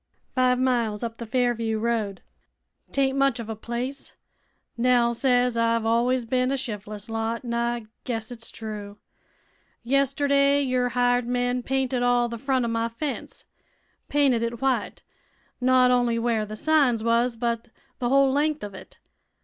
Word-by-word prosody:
"Five 255 -1 +3
miles 240 -4 0
up 230 -1 -4
the 235 - -7
Fairview 230 -2 0
road. 215 -4 -2 0.7
'Taint 270 -1 +1
much 275 -3 +2
of 225 -1 -6
a 220 - -3
place 240 +5 -5 0.6
Nell 240 0 +3
says 245 -1 +2
I've 230 -1 +1
always 240 +2 +2
bin 255 +2 +1
a 275 - +1
shif'les 210 -5 -6
lot, 225 +2 -3
an' 235 - -3
I 235 -1 -1 0.2
guess 225 -2 -4
it's 230 -2 -7
true. 210 -2 -7 0.9
Yesterday 280 +2 +2
your 255 -2 +1
hired 245 0 +1
men 245 0 0
painted 260 -1 -1
all 245 0 +3
the 235 -1 -6
front 260 -1 0
o' - - -1
my 230 0 -1
fence 275 +5 -6 0.6
painted 275 -5 +3
it 235 0 -3
white 270 0 -1 0.6
not 255 0 +5
only 245 -2 +2
where 230 -2 0
th' 215 +1 -7
signs 275 -6 +2
was, 235 +1 +2
but 230 0 -2 0.3
th' 245 - -2
whole 275 +2 +4
length 300 +1 0
of 205 -1 -6
it. 190 - -12
240 Hz, 155 wpm, -25 LUFS, 230-255 Hz, 0.9 s, not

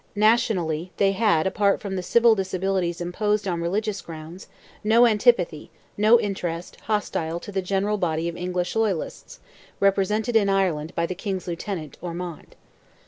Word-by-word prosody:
Nationally, 185 -6 +2
they 195 -1 +3
had, 195 -6 +2
apart 200 +1 +2
from 200 -2 -5
the 185 - -2
civil 235 +5 +4
disabilities 190 -3 -1
imposed 210 +4 -1
on 170 -2 -1
religious 200 +4 -1
grounds, 165 +3 -10 0.4
no 225 +3 +5
antipathy, 210 -8 +2 0.3
no 215 +3 +5
interest, 175 -5 -4
hostile 170 -6 -1
to 205 - -9
the 190 -1 -1
general 200 +3 0
body 165 -2 0
of 170 - -4
English 180 0 -2
loyalists, 215 -7 -2 0.4
represented 205 +4 +1
in 205 -3 +4
Ireland 180 -5 0
by 170 - +1
the 185 - -3
King's 190 0 -4
lieutenant, 170 -3 -5
Ormond. 175 -1 -7
190 Hz, 145 wpm, -24 LUFS, 170-210 Hz, 0.4 s, no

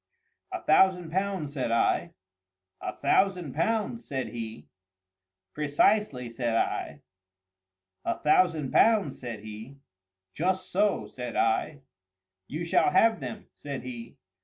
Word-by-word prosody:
"A - - -5
thousand 180 -3 +4
pounds," 190 -5 -2
said 130 -5 -2
I. 115 0 +1 0.7
"A - - -3
thousand 180 -7 +1
pounds?" 225 +7 -1
said 135 -3 -4
he. 115 -1 -7 0.9
"Precisely," 150 - +2
said 115 0 -2
I. - - -1 1.0
"A - - -1
thousand 155 -3 +2
pounds?" 210 -11 +3
said 120 -4 -6
he. 110 +5 -9 0.6
"Just 185 +3 -1
so," 205 +1 +1
said 125 -2 -7
I. 140 +6 +1 0.7
"You 155 +4 -4
shall 170 - +3
have 225 -1 +4
them," 215 - -7
said 140 -2 -6
he. 120 -2 -8
150 Hz, 115 wpm, -28 LUFS, 125-190 Hz, 1.0 s, thousand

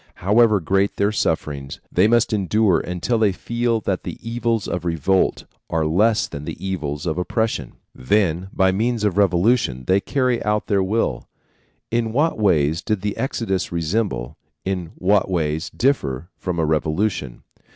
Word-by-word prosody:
However 105 +2 +4
great 95 +4 +1
their 100 +1 +1
sufferings, 75 -8 -2
they 90 +4 +4
must 115 0 +2
endure 105 -1 +2
until 90 +7 -1
they 105 -3 +3
feel 120 +4 -1
that 95 -2 -1
the - - -6
evils 115 -2 -1
of 90 -2 -3
revolt 85 +2 +1 0.2
are 80 -1 0
less 105 +8 +2
than 70 - -7
the - - -6
evils 80 -6 -3
of 85 0 -1
oppression. 110 +5 -1 0.2
Then, 90 +5 0
by 95 0 +3
means 115 +3 0
of 105 -4 +1
a - - +1
revolution, 90 - +2
they 95 +1 +3
carry 125 +1 0
out 105 0 0
their 100 -2 +1
will. 105 +5 -1 0.6
In 115 -1 0
what 150 0 +1
ways 80 -6 +2
did 105 -3 -1
the 105 0 -2
Exodus 115 -6 -2
resemble, 85 - -2 0.3
in 90 -3 -3
what 100 +1 +2
ways 80 -3 -1
differ 85 - -1
from 90 -2 -4
a 80 - +1
revolution? 80 - -1
95 Hz, 160 wpm, -21 LUFS, 85-110 Hz, 0.6 s, However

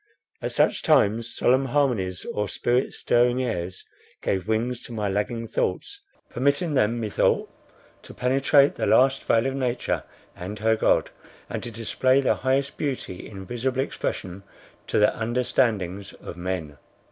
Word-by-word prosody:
At - - -3
such - - +2
times 115 -6 +3
solemn 130 +3 +2
harmonies 120 -10 0
or 105 0 -1
spirit 125 +2 0
stirring 120 +1 +2
airs 90 -6 -3 0.4
gave 95 0 -1
wings 115 +3 -1
to - - -10
my 105 -3 -2
lagging 105 +4 -2
thoughts, 405 - -2 0.3
permitting 140 +6 0
them, 120 -3 +2
methought, 110 -3 +1 0.5
to - - -12
penetrate 135 +2 +4
the - - -2
last 135 +1 +4
veil 115 +1 +2
of 135 - 0
nature 130 -2 -1 0.3
and 95 +4 -6
her 110 +2 +2
God, - - +2 0.4
and - - -3
to 120 - -5
display 125 +4 +1
the 135 - +3
highest 135 +1 0
beauty 130 -10 -4
in 95 -2 -9
visible 125 +5 -1
expression 95 -7 -4 0.5
to - - 0
the 105 0 +4
understandings 110 -5 0
of - - -9
men. 90 -5 -4
115 Hz, 145 wpm, -25 LUFS, 105-130 Hz, 0.5 s, penetrate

